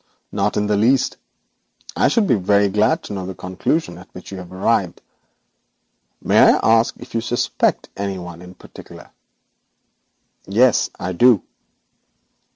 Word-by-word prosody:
'None - - -1
in 105 - 0
the 105 0 +1
least. 120 +6 +2 0.8
I - - +3
should 230 -3 +2
be 180 - +2
very 100 0 +2
glad 110 - +1
to - - -7
know 95 -2 -5
the 95 - -7
conclusion 90 - -3
at 95 - -16
which 90 - -11
you 95 - -7
have 90 -1 -11
arrived. 95 +1 0 1.2
May - - +3
I - - +6 0.2
ask 115 - -2
if - - -13
you 115 - 0
suspect 120 +1 -1
any 100 -1 -4
one 85 -1 -9
in 90 +1 -13
particular?' - - -14 1.4
'Yes, 115 +5 +3
I 90 - -3
do.' 115 +3 +4
100 Hz, 150 wpm, -20 LUFS, 90-115 Hz, 1.4 s, I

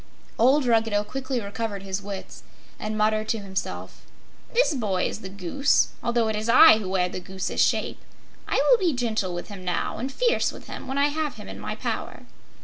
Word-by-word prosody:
Old 265 +4 +4
Ruggedo 225 -3 +2
quickly 260 +3 -3
recovered 205 -1 -4
his 195 0 -3
wits 200 -1 -7 0.4
and 215 0 -3
muttered 215 0 +1
to 225 - +1
himself: 195 -2 -5 0.5
"This 485 -8 +3
boy 205 -8 0
is - - -5
the 190 - -7
goose, 200 - +2
although 235 -1 +1
it 220 - -1
is 215 +2 -3
I 250 -1 +8
who 195 -4 -5
wear 185 -1 +1
the 180 - -5
goose's 190 +1 -3
shape. - - 0 0.5
I - - -1 0.2
will - - +6
be 355 -5 +2
gentle 220 -7 -1
with 175 - -6
him 195 -3 -9
now, 180 +3 -2
and 260 +4 -3
fierce 475 - +1
with - - -12
him - - -8
when 265 +1 -3
I 285 +1 +4
have 305 0 -2
him - - -10
in - - -8
my - - -4
power." - - -4
220 Hz, 200 wpm, -25 LUFS, 195-265 Hz, 0.5 s, I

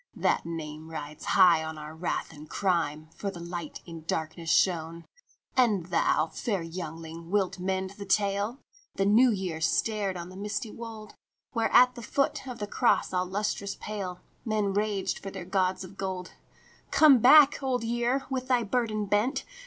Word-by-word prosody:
That - - +1
name 155 -1 -6
rides 150 -1 -7
high 175 -4 +5
on 160 0 -6
our 150 +1 -8
wrath 160 0 -3
and 150 0 -12
crime, 160 -5 -1
For 200 - -3
the 185 -3 -8
Light 170 0 -6
in 165 -2 -9
darkness 160 +1 -3
shone. 165 -2 +1 0.2
" - - -37
And 215 -9 +3
thou, 160 -2 +3
fair 200 -7 -2
youngling, 165 -1 -7
wilt 195 -2 0
mend 190 +1 -2
the 200 0 -9
tale? 200 +4 +1 0.2
" - - -31
The 195 - +1
New 225 +6 +6
Year 185 -7 -2
stared 200 +2 0
on 170 0 -7
the 185 - -11
misty 210 +4 -4
wold, 225 -2 -9 0.4
Where 230 -1 0
at 250 +1 +7
foot 275 +3 -1
of 250 -2 -6
a - - 0
cross 235 -1 +1
all 180 0 0
lustrous 200 +1 -2
pale 195 -4 -5 0.2
Men 210 -3 0
raged 205 -1 -1
for 195 - -6
their 190 -2 -7
gods 185 0 0
of 185 +2 -12
gold. 185 -2 -4 0.3
" - - -28
Come 295 -5 +7
back, 285 +5 +7
Old 255 -3 -1
Year, 240 +3 0
with 255 -1 -3
thy 250 -2 +2
burden 215 -1 -1
bent. 210 +7 0
195 Hz, 175 wpm, -28 LUFS, 170-220 Hz, 0.4 s, at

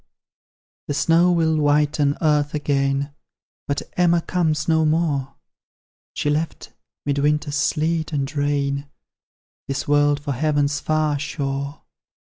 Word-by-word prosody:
The 145 - -2
snow 170 +4 +4
will 160 -2 +2
whiten 145 -1 +2
earth 150 -1 +2
again, 140 -1 0 0.5
But 140 -1 -1
Emma 175 -1 +3
comes 160 -4 0
no 160 -1 +3
more; 155 -4 0 0.8
She - - -2
left, 150 +2 -2 0.3
'mid 140 0 0
winter's 150 0 +1
sleet 160 +2 0
and 145 0 -2
rain, 140 -1 -1 0.8
This 135 0 -3
world 145 0 +3
for 145 0 -4
Heaven's 145 +1 +1
far 155 -2 0
shore. 140 0 -4
145 Hz, 115 wpm, -22 LUFS, 140-155 Hz, 0.8 s, snow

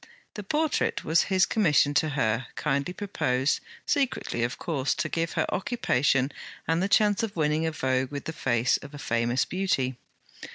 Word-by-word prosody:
The 210 - -6
portrait 300 +9 0
was 160 +1 +3
his 190 -1 +4
commission 150 -9 +3
to 155 +2 +2
her, 115 0 0
kindly 140 +2 -1
proposed, 145 -9 0 0.3
secretly 270 - 0
of 120 +1 -1
course, 140 -5 -1
to - - -1
give 165 0 -1
her - - +1
occupation 140 - +1 0.4
and 165 +2 +1
the 195 - 0
chance 205 +1 +4
of 225 -3 -3
winning 155 0 +1
a - - -1
vogue 130 -3 0
with 140 -1 -5
the 160 - -4
face 125 -5 +1
of 140 +1 -11
a - - -7
famous 120 -1 0
Beauty. 160 -9 -1
150 Hz, 170 wpm, -27 LUFS, 130-185 Hz, 0.4 s, his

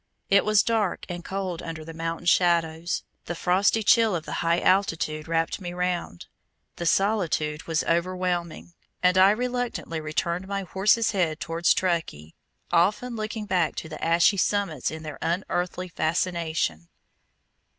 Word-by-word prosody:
It 200 - +6
was 215 -1 +4
dark 220 -5 0
and 175 -1 -5
cold 190 -3 -4
under 165 -2 -7
the 165 - -8
mountain 165 +1 -4
shadows, 170 -1 +2 0.2
the 175 - -4
frosty 195 +6 +2
chill 225 -1 +4
of 160 - -4
the - - -7
high 170 0 +2
altitude 165 -5 +1
wrapped 165 +3 -1
me 175 -1 -5
round, 180 - -3 0.5
the 170 - -2
solitude 165 -6 0
was 160 -2 0
overwhelming, 175 0 -2 0.3
and 180 0 +4
I 190 +1 +7
reluctantly 245 -7 -2
turned 170 +4 -1
my 200 0 -3
horse's 210 +5 +2
head 175 -6 0
towards 165 +2 +1
Truckee, 165 - -2 0.4
often 210 +8 +2
looking 215 0 -4
back 180 -5 0
to 160 - -6
the 155 - -8
ashy 170 +4 +4
summits 190 -9 0
in 160 0 -7
their 155 -3 -7
unearthly 180 +1 -2
fascination. 160 - -1
175 Hz, 145 wpm, -25 LUFS, 165-195 Hz, 0.5 s, I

